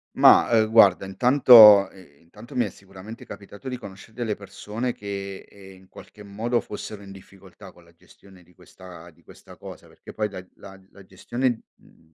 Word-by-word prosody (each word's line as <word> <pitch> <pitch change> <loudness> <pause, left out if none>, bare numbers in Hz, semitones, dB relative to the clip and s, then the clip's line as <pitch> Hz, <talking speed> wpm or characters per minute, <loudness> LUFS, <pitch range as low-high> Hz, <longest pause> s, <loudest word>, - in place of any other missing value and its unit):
Mah, - - +5
uhm, 110 -2 +2
guarda, 100 -4 +4
intanto 110 -2 +6
i 85 -7 -20
intanto 120 - -15
mi 120 - +1
è 105 - -6
sicuramente 95 +4 -14
capitato 100 +6 -12
di 125 - -5
conoscere 100 -2 -14
delle 115 -2 -4
persone 110 +4 -7
che, 100 -1 -9
ehm, 95 -1 -17
in 95 - -23
qualche 105 - -16
modo 115 +4 -3
fossero 105 0 -10
in 100 - -14
difficoltà 95 0 -17
con 85 - -22
la 85 - -24
gestione 95 +2 -22
di 85 - -26
questa 90 -1 -16
di 80 - -28
questa - - -18
cosa, - - -13
perché - - -16
poi 105 -1 -4
la 95 -2 -11
la 95 -1 -15
la 100 - -18
gestione, 120 +6 -4 0.2
mhmm, 80 -1 -27
100 Hz, 185 wpm, -22 LUFS, 95-110 Hz, 0.2 s, intanto